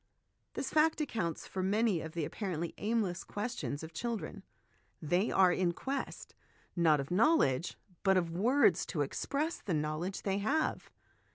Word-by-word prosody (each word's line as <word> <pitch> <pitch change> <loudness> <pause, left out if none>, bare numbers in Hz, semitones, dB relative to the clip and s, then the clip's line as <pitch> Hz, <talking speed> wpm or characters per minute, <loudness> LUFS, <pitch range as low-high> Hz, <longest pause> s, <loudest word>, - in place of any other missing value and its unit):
This - - -3
fact 315 +1 +3
accounts 215 - -2
68 - - -15
HOME 190 - -1
EDUCATION 220 - +2
for - - +4
many 190 -8 +2
of 160 - -6
the 165 -3 -1
apparently 170 -1 -3
aimless 205 -5 0
questions 205 -9 -4
of 160 +1 -8
children; 225 -1 -4 0.6
they 175 +7 +1
are 185 -2 +5
in 175 -2 +1
quest, 270 +8 -4 0.4
not 160 -4 +4
of 135 +3 -5
knowledge, 185 - +3 0.2
but 190 -1 +4
of 170 -2 0
words 200 - +3
to 155 - -2
express 285 - -2
the 180 - -1
knowledge 155 +5 -2
they 195 0 0
have. 285 +10 0
190 Hz, 165 wpm, -33 LUFS, 165-230 Hz, 0.6 s, are